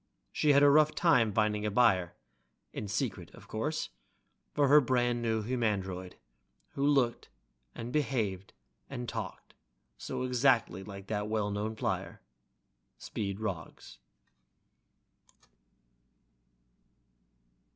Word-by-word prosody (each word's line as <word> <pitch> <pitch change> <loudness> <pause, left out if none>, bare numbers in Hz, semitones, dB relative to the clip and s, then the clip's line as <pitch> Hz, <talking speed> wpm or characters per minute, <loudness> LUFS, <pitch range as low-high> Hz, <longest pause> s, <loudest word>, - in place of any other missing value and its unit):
She 150 -1 +3
had 140 +1 +6
a 145 - +8
rough 155 +1 +4
time 125 -11 +4
finding 105 0 +1
a 105 - 0
buyer 100 -6 +3 0.6
(in 105 - -5
secret, 100 - -3
of - - -15
course) - - -2 0.6
for 145 -1 +2
her 150 +2 +7
brand 120 -2 +1
new 110 -2 0
humandroid, 100 -6 -2 0.6
who 140 - -4
looked 135 -5 +2 0.5
and 120 +2 -6
behaved 110 -10 -1 0.4
and 125 -3 -5
talked 110 -6 -6 0.5
so - - -4
exactly 125 -7 +2
like 100 -1 -9
that 105 0 -2
well 105 -1 -1
known 105 +2 -3
flyer, - - -3 0.8
Speed 100 -1 -4
Roggs.... 85 - -6
110 Hz, 110 wpm, -31 LUFS, 100-130 Hz, 0.8 s, a